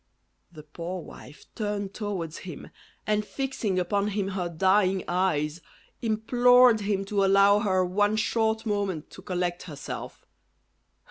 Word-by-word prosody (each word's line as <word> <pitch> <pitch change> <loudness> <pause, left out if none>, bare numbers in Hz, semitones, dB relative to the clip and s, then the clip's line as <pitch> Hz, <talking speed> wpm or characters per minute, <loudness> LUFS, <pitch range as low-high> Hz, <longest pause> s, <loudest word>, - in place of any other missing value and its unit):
The 155 -3 -12
poor 170 +4 -6
wife 145 +4 -13
turned 205 -2 -3
towards 185 -7 -4
him, 175 -5 -9 0.3
and 210 0 +1
fixing 235 -5 -3
upon 200 +3 0
him 200 -2 -2
her 185 -3 -3
dying 190 +2 +2
eyes, 170 -3 0 0.4
implored 245 +2 +4
him 200 -1 -1
to 200 0 0
allow 200 +1 +5
her 185 -3 +1
one 205 +4 +1
short 220 0 0
moment 200 -7 -2
to - - -11
collect 180 -2 -2
herself. 145 -2 -7
195 Hz, 130 wpm, -27 LUFS, 180-210 Hz, 0.4 s, allow